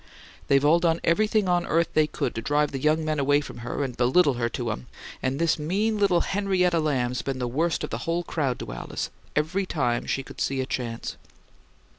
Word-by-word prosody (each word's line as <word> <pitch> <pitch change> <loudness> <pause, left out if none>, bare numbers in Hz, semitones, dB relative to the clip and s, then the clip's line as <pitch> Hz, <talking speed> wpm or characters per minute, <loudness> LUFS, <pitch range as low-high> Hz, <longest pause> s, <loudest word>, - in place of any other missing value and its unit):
They've 140 +1 +4
all 160 +3 +5
done 165 -1 +2
everything 210 +3 +2
on 175 -1 +2
earth 165 +1 +2
they 155 -1 +4
could 130 - -2
to 115 - -4
drive 145 +4 +1
the 135 - -3
young 155 +2 +2
men 155 -1 0
away 145 +1 +3
from 145 - -8
her 125 +4 -3
and 130 -3 -4
belittle 130 +5 +4
her 120 -1 -1
to 120 -1 -3
'em; 115 +3 -6 0.3
and 130 +1 -1
this 165 0 +1
mean 205 +8 0
little 190 -4 +3
Henrietta 185 -4 +1
Lamb's 125 -5 0
been 135 -1 -3
the 125 -1 -2
worst 160 +7 0
of - - -4
the - - -3
whole 170 +1 -1
crowd 140 -7 -1
to - - -6
Alice, - - -5 0.2
every 180 +6 0
time 120 -8 0
she 135 - -1
could - - -9
see 135 0 0
a 130 - 0
chance." 120 -4 -4
150 Hz, 215 wpm, -26 LUFS, 130-170 Hz, 0.3 s, all